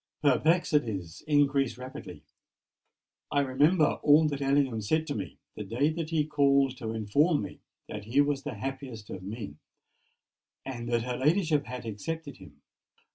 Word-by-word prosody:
Perplexities 145 - +1
increase 140 -5 +2
rapidly. 130 +1 -9 1.1
I 145 - +3
remember 145 +5 +3
all 150 +2 +6
that 140 -1 -4
Ellingham 135 -4 +2
said 155 +10 +1
to 145 - -3
me 95 -9 -5 0.2
the 105 - -5
day 120 +9 +1
that 160 -1 -4
he 160 -3 +1
called 140 -3 +3
to 115 -4 -5
inform 115 - +2
me - - -8 0.3
that 105 -1 -7
he 120 +6 +1
was 145 -1 +2
the 125 - -5
happiest 130 -2 -6
of 95 - -6
men, 100 -5 -7 1.1
and 120 -3 -5
that 120 -1 +1
her 125 0 -3
ladyship 155 0 +2
had 125 0 -6
accepted 145 +8 -5
him. 70 -6 -16
135 Hz, 150 wpm, -29 LUFS, 110-150 Hz, 1.1 s, all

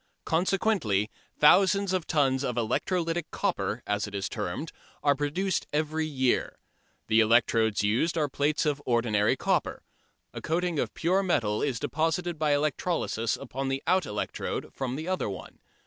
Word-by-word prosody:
Consequently 165 - +1 0.3
thousands 195 +4 +5
of 185 -3 -1
tons 135 -4 +2
of 125 -3 -2
"electrolytic" 165 - -1
copper, 175 - -2
as 105 +1 -1
it 100 - -8
is 100 0 -2
termed, 145 - -4 0.3
are 145 - +5
produced 150 +7 -1
every 155 +1 -1
year. 130 -4 0 0.5
The 110 0 +3
electrodes 110 -1 +3
used 120 +12 +1
are 150 -2 +2
plates 145 +3 0
of 145 -1 0
ordinary 115 -4 +2
copper. - - -1 0.5
A - - -6
coating 170 -1 -1
of - - -2
pure 185 +4 +2
metal 110 - 0
is 130 -5 -1
deposited 165 +2 -1
by 150 -2 +3
electrolysis 145 -5 -1
upon 135 0 -5
the 135 +1 -2
out 185 +1 +2
electrode 105 0 -4
from 130 -1 -3
the 155 +4 -5
other 185 - -1
one. 95 - -8
145 Hz, 150 wpm, -28 LUFS, 115-170 Hz, 0.5 s, thousands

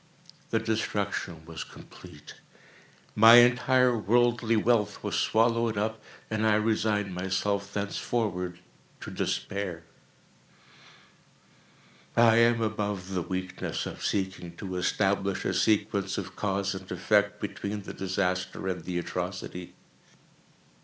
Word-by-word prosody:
The 115 - +1
destruction 105 -7 -2
was 80 -1 -6
complete. - - -13 0.8
My 115 +2 +9
entire 125 +1 +5
worldly 115 +2 +2
wealth 110 -2 +1
was - - -3
swallowed 115 -1 +2
up, 110 +1 -2 0.3
and 110 0 -2
I 110 -1 +4
resigned 105 -2 0
myself 100 +2 -1
thenceforward 100 -3 -2 0.4
to - - -7
despair. 95 -4 -3 2.3
I 115 -1 +6
am 115 0 +4
above 105 -3 -3
the 90 - 0
weakness 95 +1 -4
of - - -7
seeking 95 -3 -2
to 95 -3 -5
establish 95 +1 0
a - - 0
sequence 100 0 +1
of - - -5
cause 100 -1 -1
and 95 0 -8
effect, 100 +3 +2
between 105 0 -4
the - - -7
disaster 95 0 -2
and 90 -3 -3
the 90 +1 -3
atrocity. 90 0 -5
100 Hz, 110 wpm, -28 LUFS, 95-110 Hz, 2.3 s, My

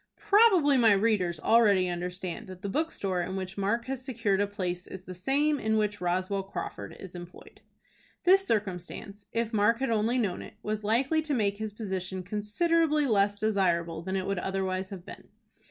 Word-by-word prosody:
Probably 380 - +5
my 225 -4 +6
readers 195 -5 +1
already 205 -3 +4
understand 180 0 -4
that 185 +1 -11
the 200 - -2
bookstore 195 - -1
in 190 +2 -4
which 190 0 -5
Mark 205 +4 0
has 265 -1 -4
secured 225 -7 0
a 205 - +1
place 180 -3 -4
is 190 -1 -9
the 185 - -8
same 280 - +1
in 220 0 +1
which 210 -1 -1
Roswell 185 +2 0
Crawford 105 - -7
is 190 -2 -10
employed. 175 0 -11 0.6
This 385 +2 +6
circumstance, 200 - -3
if 230 0 -2
Mark 215 +2 +3
had 265 -1 -1
only 225 +3 +1
known 200 -7 -1
it, - - -11
was 215 0 -3
likely 260 +9 +2
to 305 -2 -2
make 200 -4 0
his 215 0 -4
position 190 -3 -4
considerably 300 - +1
less 205 -4 +2
desirable 175 -6 0
than 190 +3 -3
it 190 -1 -1
would 195 -2 -1
otherwise 190 0 -2
have 185 -3 -9
been. - - -11
205 Hz, 180 wpm, -28 LUFS, 185-230 Hz, 0.6 s, my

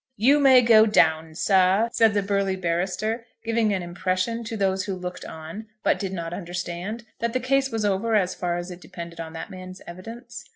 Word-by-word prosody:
"You 270 +8 +5
may 260 -3 +7
go 225 -1 +7
down, 160 -6 +2
sir," 190 +4 +3
said 225 -3 +3
the 205 - +2
burly 200 -1 0
barrister, 190 +6 -1 0.2
giving 225 -1 +1
an 190 -3 -1
impression 185 +6 -2
to 225 0 -4
those 190 -1 0
who 195 -2 -3
looked 180 0 -6
on, 160 +8 -8 0.2
but - - +2
did 195 -3 -3
not 170 -2 -4
understand, 180 +5 -5
that 235 0 -1
the 255 - +1
case 270 +1 +1
was 225 -3 -2
over 205 +3 +1
as 185 -3 +2
far 175 -1 -2
as 175 +1 -5
it 180 0 -10
depended 170 -1 -9
on 160 -1 -6
that 165 - -7
man's 185 0 -9
evidence. 225 +8 -9
195 Hz, 200 wpm, -25 LUFS, 175-225 Hz, 0.2 s, may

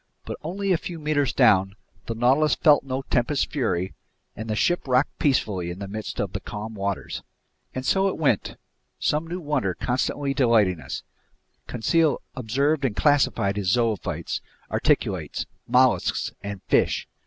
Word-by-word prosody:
But - - -5
only 195 +5 -2
a 175 - +3
few 175 - -6
meters 150 -4 +1
down, 95 -6 +4 0.3
the 115 - -3
Nautilus 135 +6 +3
felt 150 -3 +5
no 135 0 -3
tempest's 135 +3 +1
fury, 95 - -1 0.4
and 110 +1 -6
the 110 - 0
ship 175 +6 +1
rocked 130 +2 +1
peacefully 100 - +1
in 85 - -5
the 100 0 -6
midst 105 +2 -6
of - - -2
the - - -2
calm 110 +2 -6
waters. 100 -2 -3 0.5
And 130 0 -3
so 195 +5 +3
it 195 - -2
went, 140 -10 +1 0.4
some 155 +2 0
new 175 +2 -4
wonder 145 - -1
constantly 135 +3 -1
delighting 110 - +3
us. - - -6 0.6
Conseil 155 +6 +2 0.2
observed 140 +5 0
and 120 -6 0
classified 135 -9 +2
his 100 -3 0
zoophytes, 115 0 0 0.3
articulates, - - 0 0.2
mollusks, 125 0 +3
and 100 0 -6
fish. - - +1
130 Hz, 155 wpm, -25 LUFS, 105-150 Hz, 0.6 s, felt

